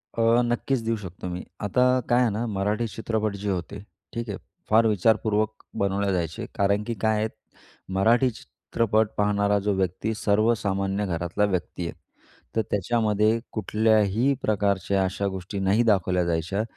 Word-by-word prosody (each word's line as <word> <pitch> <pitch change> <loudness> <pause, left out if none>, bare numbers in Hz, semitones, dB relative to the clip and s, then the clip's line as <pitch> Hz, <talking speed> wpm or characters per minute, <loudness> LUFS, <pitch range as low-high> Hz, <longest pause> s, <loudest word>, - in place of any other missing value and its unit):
अ, 115 +1 +4
नक्कीच 130 +2 0
देऊ 115 0 +1
शकतो 90 -2 -8
मी. 90 0 -5 0.2
आता 115 +5 +2 0.3
काय 120 +1 +4
आहे 120 - +3
ना, 110 +4 -2
मराठी 105 +3 -1
चित्रपट 110 0 -2
जे 100 +1 -4
होते 95 +2 -3 0.3
ठीक 115 -1 -4
आहे, 100 - -3 0.3
फार 110 +1 +5
विचारपूर्वक 110 +1 +1 0.2
बनवले 100 0 +1
जायचे. 85 -3 -2
कारण 100 +1 +2
की 115 - -3
काय 110 -1 +2
आहे, - - +1 0.7
मराठी 115 +7 +4
चित्रपट 110 - -1
पाहणारा 105 0 +2
जो 105 - +2
व्यक्ती 95 +4 -1
सर्वसामान्य 100 -2 +1
घरातला 85 +3 0
व्यक्ती 90 -2 -2
आहे. - - -5 0.6
तर 110 - +3
त्याच्यामध्ये 110 +1 +2
कुठल्याही 110 +3 +2
प्रकारच्या 100 -2 +1
अशा 100 +2 -2
गोष्टी 95 +1 -5
नाही 100 +5 +3
दाखवल्या 90 -4 +2
जायच्या, 85 +5 -1
105 Hz, 145 wpm, -25 LUFS, 95-110 Hz, 0.7 s, फार